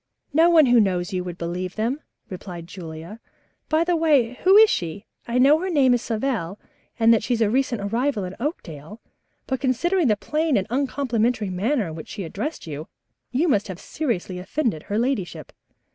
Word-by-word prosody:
"No 325 +3 +5
one 325 -3 +6
who 245 -2 +5
knows 185 -2 0
you 180 -1 -1
would 175 -1 -6
believe 180 +2 -4
them," 240 +7 -1 0.3
replied 180 -2 -8
Julia. 170 +2 -9 0.5
"By 315 +1 +3
the 350 0 +1
way, 290 -8 +3
who 380 +2 +7
is 440 +1 +9
she? 175 +5 -3 0.2
I 235 +1 -1
know 280 +5 +5
her 375 +2 -3
name 275 -7 +4
is 245 - +1
Savell 220 -6 -2 0.4
and 230 0 +5
that 225 - +3
she's 235 +1 -1
a 215 -2 +2
recent 260 -3 0
arrival 230 +2 -1
in 185 +1 -6
Oakdale, 205 - -6 0.5
but 265 -1 -3
considering 325 +6 +1
the 210 -3 +2
plain 305 +4 0
and 190 - 0
uncomplimentary 245 -5 0
manner 215 +6 0
in 160 - -6
which 160 0 -8
she 205 - -5
addressed 210 - -5
you, 155 0 -6 0.4
you 280 +8 +1
must 215 -9 +2
have 185 -3 -7
seriously 195 - -3
offended 210 - -2
her 205 - -3
ladyship." 200 - -2
230 Hz, 185 wpm, -23 LUFS, 185-275 Hz, 0.5 s, is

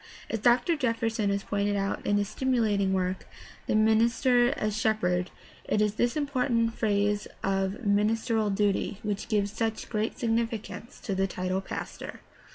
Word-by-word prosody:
As 225 - -1
Dr. 245 +8 +3
Jefferson 230 -6 0
has 200 0 -1
pointed 205 0 0
out 195 0 -2
in 205 - +3
his 205 0 0
stimulating 215 -4 +1
work, 185 0 -1 0.4
The - - +1
Minister 235 +3 +4
as 215 -1 -1
Shep 220 0 +1
herd, 180 0 +1 0.4
it - - 0
is 210 -1 +2
this 240 +6 0
important 250 -5 +1
phase 205 -1 0 0.2
of 195 +4 -1
ministerial 215 +2 +2
duty 200 0 0
which 210 -1 -3
gives 205 -3 +1
such 225 -1 -2
great 215 0 -2
significance 230 0 -2
to 200 - -3
the 195 0 +1
title 185 +1 -2
''pastor." - - -6
215 Hz, 155 wpm, -28 LUFS, 200-230 Hz, 0.4 s, Minister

